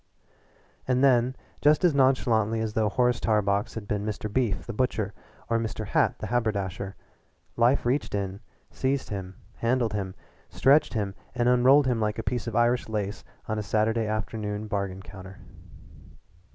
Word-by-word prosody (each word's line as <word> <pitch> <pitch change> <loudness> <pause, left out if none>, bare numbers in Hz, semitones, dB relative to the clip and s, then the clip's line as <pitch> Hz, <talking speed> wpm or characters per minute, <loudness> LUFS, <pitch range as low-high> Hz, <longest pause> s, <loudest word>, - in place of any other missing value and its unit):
'" - - -34
And 130 +1 +2
then, 125 -1 +4 0.3
just 150 +4 +4
as 170 - +4
nonchalantly 120 -5 +2
as 110 -1 -2
though 110 -1 +1
Horace 125 +3 +2
Tarbox 100 -2 +1
had 110 -2 -6
been 105 -1 -1
Mr. 105 0 -4
Beef 120 -5 0
the 120 - -5
butcher 105 -4 -1 0.3
or 115 0 +1
Mr. 110 -1 -4
Hat - - +1
the - - -6
haberdasher, 100 -5 -2 0.6
life 120 +3 +3
reached 125 -2 0
in, 100 -1 -3 0.3
seized 135 0 -1
him, 95 -2 -5 0.2
handled 115 -2 +1
him, 95 -2 -3 0.3
stretched 140 0 +3
him, 100 -3 -1 0.2
and 120 -1 +1
unrolled 130 +3 +5
him 125 -3 +1
like 105 0 0
a 115 - -3
piece 120 0 -2
of 115 - -4
Irish 120 0 +2
lace 105 -1 -3 0.2
on 110 0 -1
a - - -1
Saturday 110 +2 +1
afternoon 110 -1 -3
bargain 100 -2 -3
counter. 95 0 -11
110 Hz, 165 wpm, -27 LUFS, 105-125 Hz, 0.6 s, unrolled